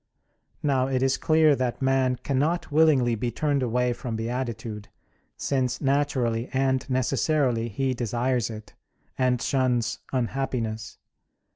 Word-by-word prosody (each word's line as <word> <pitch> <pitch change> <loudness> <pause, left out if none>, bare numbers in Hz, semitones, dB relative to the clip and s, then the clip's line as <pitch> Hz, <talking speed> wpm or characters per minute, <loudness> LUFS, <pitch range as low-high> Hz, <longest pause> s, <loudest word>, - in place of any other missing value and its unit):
Now 135 -3 +2
it 130 -1 0
is 135 0 +3
clear 155 -2 +4
that 125 -2 -2
man 130 -1 +2
cannot 150 +5 0
willingly 145 -6 +4
be 115 +2 -1
turned 140 +3 0
away 125 0 +1
from 120 -1 -5
beatitude, 115 -2 -4 0.5
since 130 -3 -1
naturally 135 -5 0
and 130 0 0
necessarily 130 -2 +1
he 130 +5 -1
desires 120 0 -1
it, 110 -2 -9 0.4
and 125 -1 +1
shuns 125 -3 0
unhappiness. 120 -3 -2
130 Hz, 120 wpm, -26 LUFS, 120-135 Hz, 0.5 s, clear